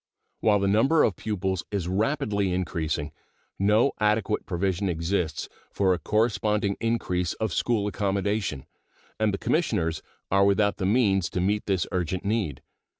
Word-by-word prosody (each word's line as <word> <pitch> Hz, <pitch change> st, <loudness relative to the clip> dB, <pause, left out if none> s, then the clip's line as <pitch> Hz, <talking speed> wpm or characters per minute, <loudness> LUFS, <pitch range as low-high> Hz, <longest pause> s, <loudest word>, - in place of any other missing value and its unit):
While 105 Hz, -2 st, +3 dB
the 100 Hz, 0 st, 0 dB
number 135 Hz, +11 st, +4 dB
of 100 Hz, -, +2 dB
pupils 95 Hz, -3 st, -2 dB
is 100 Hz, -4 st, -2 dB
rapidly 105 Hz, -1 st, 0 dB
increasing, 80 Hz, -4 st, -2 dB, 0.5 s
no 105 Hz, +7 st, +4 dB
adequate 105 Hz, 0 st, +1 dB
provision 95 Hz, +1 st, -1 dB
exists 85 Hz, -1 st, -1 dB, 0.2 s
for 95 Hz, -2 st, +2 dB
a 90 Hz, -, -2 dB
corresponding 105 Hz, -2 st, +1 dB
increase 90 Hz, -6 st, 0 dB
of 110 Hz, -5 st, -3 dB
school 115 Hz, -4 st, +1 dB
accommodation, 100 Hz, -6 st, -1 dB, 0.5 s
and 110 Hz, -1 st, +2 dB
the 100 Hz, -, -2 dB
Commissioners 80 Hz, -, 0 dB, 0.3 s
are 100 Hz, +1 st, +4 dB
without 100 Hz, +1 st, +2 dB
the 95 Hz, -, -1 dB
means 100 Hz, -6 st, +2 dB
to -, -, -3 dB
meet 105 Hz, +3 st, 0 dB
this 95 Hz, -3 st, +1 dB
urgent 90 Hz, 0 st, -2 dB
need. 100 Hz, -, -1 dB
100 Hz, 145 wpm, -26 LUFS, 90-105 Hz, 0.5 s, number